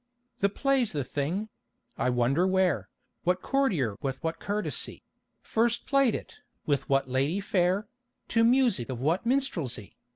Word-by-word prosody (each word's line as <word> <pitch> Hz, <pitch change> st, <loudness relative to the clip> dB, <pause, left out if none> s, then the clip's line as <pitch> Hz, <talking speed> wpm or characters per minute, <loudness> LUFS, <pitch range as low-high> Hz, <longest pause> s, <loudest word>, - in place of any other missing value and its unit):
The 200 Hz, -, +3 dB
play's 265 Hz, 0 st, +1 dB
the 145 Hz, -2 st, -1 dB
thing; 160 Hz, +11 st, -2 dB, 0.5 s
I -, -, 0 dB
wonder 125 Hz, +8 st, +2 dB
where, 190 Hz, -4 st, +1 dB, 0.3 s
What 180 Hz, +1 st, +1 dB
courtier 185 Hz, -, +1 dB
with 135 Hz, +3 st, -3 dB
what 165 Hz, 0 st, -2 dB
courtesy 210 Hz, +1 st, -1 dB, 0.4 s
First 235 Hz, +1 st, +1 dB
played 275 Hz, -5 st, +3 dB
it, -, -, -8 dB, 0.3 s
with 145 Hz, -3 st, 0 dB
what 135 Hz, -1 st, +2 dB
lady 135 Hz, +8 st, 0 dB
fair, 195 Hz, +1 st, +1 dB, 0.4 s
To 230 Hz, -1 st, +3 dB
music 235 Hz, -, +3 dB
of 125 Hz, -3 st, -4 dB
what 165 Hz, -, 0 dB
minstrelsy? 175 Hz, -, -1 dB
180 Hz, 140 wpm, -28 LUFS, 140-230 Hz, 0.5 s, The